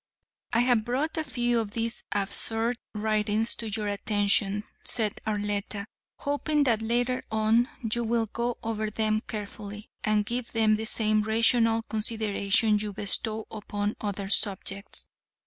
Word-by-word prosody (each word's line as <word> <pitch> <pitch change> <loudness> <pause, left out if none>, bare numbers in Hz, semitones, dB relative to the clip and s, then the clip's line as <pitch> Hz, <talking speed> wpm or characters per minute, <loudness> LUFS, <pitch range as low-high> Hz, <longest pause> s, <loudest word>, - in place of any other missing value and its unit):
"I 230 - +3
have 245 -3 +3
brought 265 +7 -1
a - - 0
few 240 -4 +1
of 220 -2 -2
these 230 0 -1
absurd 225 +4 +1 0.2
writings 215 +1 +1
to 225 - -4
your 210 0 -2
attention," 205 0 +2 0.2
said 215 -3 0
Arletta, 205 -1 -2 0.3
"hoping 290 +1 +1
that 230 -5 +2
later 245 +3 +1
on 220 +3 +3 0.2
you 235 - 0
will 230 0 +1
go 235 +2 -2
over 220 -1 -1
them 215 0 +1
carefully 210 -1 -7
and 215 -1 +2
give 240 +1 -3
them 220 -1 +4
the 220 +1 0
same 215 -1 +2
rational 225 +1 +3
consideration 215 -1 +1
you 210 -1 -3
bestow 215 +2 0
upon 205 -1 -3
other 200 -2 -3
subjects. 200 0 -1
220 Hz, 140 wpm, -28 LUFS, 210-230 Hz, 0.3 s, them